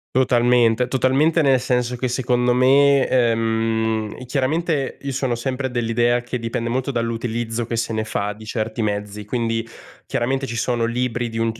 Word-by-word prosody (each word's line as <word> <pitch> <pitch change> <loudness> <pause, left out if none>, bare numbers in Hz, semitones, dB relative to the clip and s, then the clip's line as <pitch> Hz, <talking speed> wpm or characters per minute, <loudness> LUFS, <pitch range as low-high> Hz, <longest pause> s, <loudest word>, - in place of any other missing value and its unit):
Totalmente, 120 -1 +3
totalmente, 135 +6 +2
nel 135 -3 +4
senso 125 0 -1
che 130 - -1
secondo 125 0 +1
me 135 +2 +5
ehm, 115 -2 0
chiaramente 140 +3 -1
io 140 - -4
sono 130 -2 -1
sempre 130 +2 -3
dell'idea 120 0 +1
che 120 +1 -4
dipende 115 0 -3
molto 130 +3 -1
dall'utilizzo 115 -1 -2
che 115 - -3
se 115 0 -1
ne 110 0 -2
fa 105 -1 -2
di 110 +2 -11
certi 110 0 -3
mezzi, 105 0 -3
quindi 115 0 -2 0.4
chiaramente 135 +1 -1
ci 115 - -5
sono 120 0 0
libri 120 0 -1
di 115 -1 -6
un 115 0 +1
c 115 - -14
120 Hz, 165 wpm, -21 LUFS, 115-130 Hz, 0.4 s, me